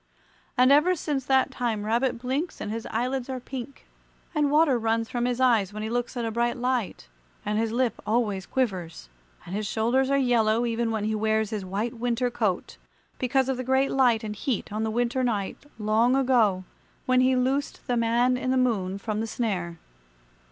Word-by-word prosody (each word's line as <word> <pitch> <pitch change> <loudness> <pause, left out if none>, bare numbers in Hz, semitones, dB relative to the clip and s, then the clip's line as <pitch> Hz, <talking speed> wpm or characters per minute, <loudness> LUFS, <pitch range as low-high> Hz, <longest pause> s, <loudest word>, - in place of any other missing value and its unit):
And 255 +2 +5
ever 310 +6 +5
since 290 -5 -3
that 265 -1 +3
time 225 -4 -2
Rabbit 240 +3 +1
blinks 265 +8 -3
and 210 - -4
his 225 +1 -4
eyelids 250 +3 -2
are 260 -1 -3
pink, 260 +2 -8 0.5
and 295 -3 +2
water 295 -4 +4
runs 225 0 0
from 245 -2 -1
his 245 0 -1
eyes 230 -7 +3
when 215 +1 -6
he 220 - -3
looks 245 +1 -2
at 235 - -1
a 225 - -2
bright 240 +3 0
light; 245 - -2 0.4
and 210 +1 0
his 225 -1 0
lip 245 0 0
always 210 -4 0
quivers; 185 - -2 0.4
and 175 - -8
his 210 +1 -2
shoulders 240 +5 +1
are 275 - +3
yellow, 235 -3 +2
even 230 0 -1
when 220 -2 -2
he 215 +1 0
wears 220 0 0
his 210 -3 -3
white 200 +5 -3
winter 245 +1 0
coat, 210 -7 -2 0.4
because 265 +1 +1
of 265 -1 -1
the 255 - -3
great 265 +2 +2
light 245 -4 +3
and 210 -1 -5
heat 225 -3 -3
on 215 - -2
the 220 - 0
winter 240 +3 0
night 220 +2 -2
long 225 +4 +2
ago 235 -8 +3 0.4
when 255 0 +3
he 260 0 +3
loosed 265 +3 -1
the 245 - 0
Man 240 +2 +2
in 255 - -3
the 260 - +2
Moon 200 -7 0
from 215 +1 -3
the 225 - -2
snare. 185 -8 -2
240 Hz, 195 wpm, -26 LUFS, 215-255 Hz, 0.5 s, And